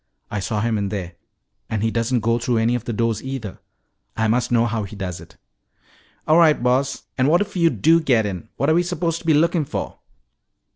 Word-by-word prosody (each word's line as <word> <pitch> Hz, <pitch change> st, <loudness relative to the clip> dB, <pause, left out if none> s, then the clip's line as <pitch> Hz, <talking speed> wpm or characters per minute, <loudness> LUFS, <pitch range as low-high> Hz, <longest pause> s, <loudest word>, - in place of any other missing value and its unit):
I 105 Hz, -, -2 dB
saw 105 Hz, +2 st, -2 dB
him 110 Hz, -1 st, 0 dB
in 100 Hz, -1 st, -2 dB
there. 95 Hz, -4 st, -5 dB, 0.6 s
And 110 Hz, -1 st, -2 dB
he 115 Hz, -, +1 dB
doesn't 115 Hz, +1 st, 0 dB
go 115 Hz, +2 st, +1 dB
through 120 Hz, 0 st, 0 dB
any 115 Hz, +2 st, +2 dB
of 120 Hz, -1 st, -3 dB
the -, -, -3 dB
doors, 115 Hz, -1 st, -1 dB
either. 130 Hz, -7 st, -6 dB, 0.6 s
I 110 Hz, -, +1 dB
must 120 Hz, +3 st, 0 dB
know 120 Hz, -1 st, +3 dB
how 115 Hz, -1 st, -1 dB
he 100 Hz, 0 st, -7 dB
does 95 Hz, -3 st, -5 dB
it." -, -, -16 dB, 0.9 s
"All 155 Hz, +2 st, +5 dB
right, 155 Hz, -6 st, +4 dB
Boss. 130 Hz, +2 st, +1 dB, 0.2 s
And 130 Hz, -, +3 dB
what 170 Hz, +4 st, +4 dB
if 205 Hz, -, -4 dB
you 170 Hz, -2 st, +4 dB
do 165 Hz, +1 st, +3 dB
get 120 Hz, -8 st, +2 dB
in? 95 Hz, -5 st, -5 dB
What 140 Hz, +4 st, +2 dB
are -, -, +4 dB
we 170 Hz, -, +4 dB
supposed 170 Hz, -1 st, -2 dB
to 165 Hz, -, -11 dB
be 160 Hz, -, +5 dB
lookin' 165 Hz, +1 st, +2 dB
for?" -, -, -5 dB
120 Hz, 225 wpm, -21 LUFS, 110-155 Hz, 0.9 s, All